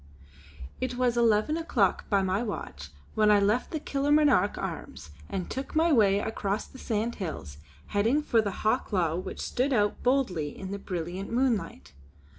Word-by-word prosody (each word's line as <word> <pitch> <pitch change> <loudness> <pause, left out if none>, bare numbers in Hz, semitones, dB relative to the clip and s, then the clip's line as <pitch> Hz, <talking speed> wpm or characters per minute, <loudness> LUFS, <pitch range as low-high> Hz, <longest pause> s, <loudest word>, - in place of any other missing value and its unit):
It 255 -1 -2
was 245 -1 +1
eleven 230 +4 +3
o'clock 230 - 0
by 200 -1 +3
my 190 +2 0
watch 75 - -5 0.2
when 215 -1 +3
I 210 -1 +6
left 210 +5 +1
the 315 - -3
Kilmarnock 285 -6 +2
Arms 75 - -6 0.2
and 185 - -3
took 265 +3 -5
my 325 +1 +4
way 200 -5 +4
across 205 -1 -2
the 260 - -14
sandhills, 200 - -3 0.3
heading 230 +9 +1
for 230 -6 +3
the 200 -3 -5
Hawklaw 185 -8 +1
which 185 - -7
stood 260 +3 -1
out 210 -3 +1
boldly 220 - 0
in 190 0 -6
the 200 - -4
brilliant 180 +1 -5
moonlight. 230 - -1
215 Hz, 155 wpm, -28 LUFS, 195-255 Hz, 0.3 s, I